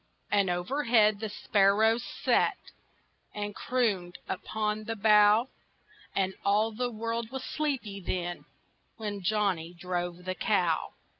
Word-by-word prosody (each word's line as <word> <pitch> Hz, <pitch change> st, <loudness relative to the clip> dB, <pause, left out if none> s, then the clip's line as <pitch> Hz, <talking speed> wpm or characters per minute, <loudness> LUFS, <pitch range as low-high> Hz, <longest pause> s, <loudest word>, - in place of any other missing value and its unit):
And 200 Hz, -2 st, +3 dB
overhead 215 Hz, +3 st, +2 dB
the 220 Hz, 0 st, -3 dB
sparrows 210 Hz, +3 st, +3 dB
sat -, -, +1 dB, 0.8 s
And 205 Hz, 0 st, -3 dB
crooned 205 Hz, -10 st, -1 dB
upon 215 Hz, +2 st, -2 dB
the 225 Hz, -, -3 dB
bough, 210 Hz, +3 st, +5 dB, 0.7 s
And 190 Hz, -1 st, +1 dB
all 210 Hz, +3 st, +2 dB
the 245 Hz, +3 st, -2 dB
world 230 Hz, 0 st, -3 dB
was 265 Hz, +1 st, -5 dB
sleepy 260 Hz, -11 st, -2 dB
then, 175 Hz, -1 st, -4 dB, 0.5 s
When 205 Hz, -3 st, -4 dB
Johnny 180 Hz, -4 st, 0 dB
drove 175 Hz, 0 st, -4 dB
the 185 Hz, -, -1 dB
cow. 180 Hz, -4 st, 0 dB
210 Hz, 120 wpm, -29 LUFS, 185-225 Hz, 0.8 s, bough